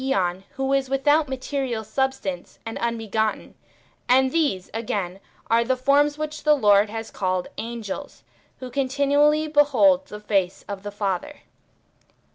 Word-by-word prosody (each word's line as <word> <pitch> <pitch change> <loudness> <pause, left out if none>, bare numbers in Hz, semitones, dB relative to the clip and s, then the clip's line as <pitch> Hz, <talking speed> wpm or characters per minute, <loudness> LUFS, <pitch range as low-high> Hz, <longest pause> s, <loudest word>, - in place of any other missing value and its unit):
which 265 - -3
ffive 270 - +2
form 180 -7 +1
to 180 - -15
that 190 - -25
^on - - -31
who 270 0 0
is 270 -1 +1
without 290 +2 +2
material 260 -3 -3
sub 265 +5 0
stance 190 -9 -6
and 225 - -5
unbegotten, 220 -2 -2 0.6
and 260 +1 +4
these, 285 - 0
again, 200 -5 -3 0.3
are 230 +1 +3
the 255 +2 0
forms 290 +3 +3
which 305 0 -4
the 300 -1 +4
Lord 205 -5 +4
has 225 +1 -6
called 185 -2 -2
angels, 235 +3 -6 0.3
who 255 -1 -8
continually 285 +3 +2
behold 290 -1 +4
the 210 - -8
face 195 -3 -1
of 200 -1 -5
the 205 - -6
Father. 205 +6 -3
255 Hz, 165 wpm, -24 LUFS, 205-280 Hz, 0.6 s, and